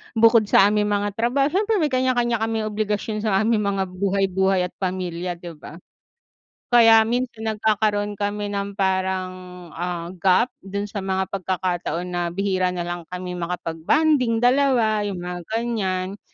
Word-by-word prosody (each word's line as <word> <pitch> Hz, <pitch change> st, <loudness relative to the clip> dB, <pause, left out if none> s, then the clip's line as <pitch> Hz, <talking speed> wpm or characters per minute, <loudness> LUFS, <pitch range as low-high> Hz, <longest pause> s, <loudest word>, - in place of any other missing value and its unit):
bukod 225 Hz, -1 st, +5 dB
sa 200 Hz, 0 st, +5 dB
aming 210 Hz, 0 st, +1 dB
mga 205 Hz, 0 st, 0 dB
trabaho 245 Hz, +7 st, +1 dB
siyempre 425 Hz, +4 st, +1 dB
may 310 Hz, -7 st, +1 dB
kanya-kanya 245 Hz, -3 st, +1 dB
kaming 225 Hz, 0 st, -1 dB
obligasyon 210 Hz, 0 st, -2 dB
sa 210 Hz, -2 st, 0 dB
aming 215 Hz, -2 st, +1 dB
mga 195 Hz, -1 st, 0 dB, 0.2 s
buhay-buhay 190 Hz, -1 st, +1 dB
at 180 Hz, -, -4 dB
pamilya, 180 Hz, -2 st, -3 dB
'di 170 Hz, -2 st, -10 dB
ba? 150 Hz, -, -10 dB, 0.9 s
Kaya 225 Hz, -2 st, +7 dB
minsan 240 Hz, -2 st, -2 dB
nagkakaroon 210 Hz, -1 st, 0 dB
kami 205 Hz, 0 st, -3 dB
ng 200 Hz, 0 st, -4 dB
parang, 190 Hz, -1 st, 0 dB, 0.4 s
ah, 175 Hz, 0 st, -4 dB
gap 195 Hz, +7 st, +3 dB
dun 200 Hz, +1 st, -4 dB
sa 205 Hz, 0 st, -5 dB
mga 190 Hz, 0 st, -1 dB
pagkakataon 180 Hz, -2 st, -2 dB
na 175 Hz, -1 st, -2 dB
bihira 185 Hz, 0 st, 0 dB
nalang 175 Hz, -1 st, -4 dB
kami 180 Hz, 0 st, -6 dB
makapag-bonding 225 Hz, -, 0 dB
2, 245 Hz, -5 st, +3 dB
yung 195 Hz, -, -4 dB
mga 180 Hz, 0 st, -5 dB
ganiyan. 205 Hz, -4 st, -2 dB
200 Hz, 145 wpm, -22 LUFS, 185-225 Hz, 0.9 s, Kaya